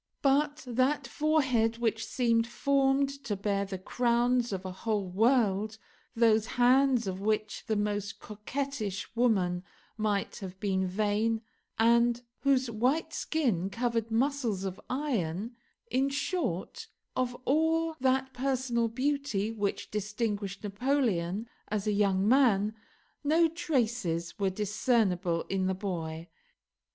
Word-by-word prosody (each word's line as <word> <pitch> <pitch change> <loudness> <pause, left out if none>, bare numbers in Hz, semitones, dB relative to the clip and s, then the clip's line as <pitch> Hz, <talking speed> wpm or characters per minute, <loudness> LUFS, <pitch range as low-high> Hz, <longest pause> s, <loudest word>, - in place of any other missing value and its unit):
But 290 +2 +2
that 255 +4 +1
forehead 260 -7 +1
which 225 -1 0
seemed 230 -2 +2
formed 275 +2 +1
to 215 -4 -2
bear 200 0 -1
the 195 -1 -5
crowns 240 +4 +1
of 190 -1 -4
a 185 - -4
whole 205 +1 -2
world; 215 0 +2 0.4
those 225 -2 +4
hands, 255 0 +4
of 190 0 -4
which 215 0 -1
the 220 - +1
most 205 -1 -2
coquettish 215 -1 -4
women 190 -7 +2 0.3
might 210 -2 -1
have 190 -1 -8
been 190 -2 0
vain, 215 +3 0 0.3
and 235 +1 +3 0.2
whose 265 -2 +2
white 255 +9 0
skin 225 - 0
covered 230 +1 -1
muscles 235 -4 0
of 190 -1 -5
iron; 235 - -2 0.4
in 270 +2 +2
short, 320 - -2 0.3
of 250 -1 -1
all 320 +3 +2
that 265 0 +1
personal 250 -2 0
beauty 255 -3 -1
which 205 -3 -3
distinguished 210 -1 -3
Napoleon 210 -3 0 0.2
as 210 -1 -2
a 210 - +1
young 200 -1 +2
man, 220 -5 +4 0.5
no 320 +3 +4
traces 235 - -1
were 195 -1 +2
discernible 195 -4 +1
in 190 -1 -1
the 190 - 0
boy. 170 -4 -4
225 Hz, 120 wpm, -30 LUFS, 200-260 Hz, 0.5 s, those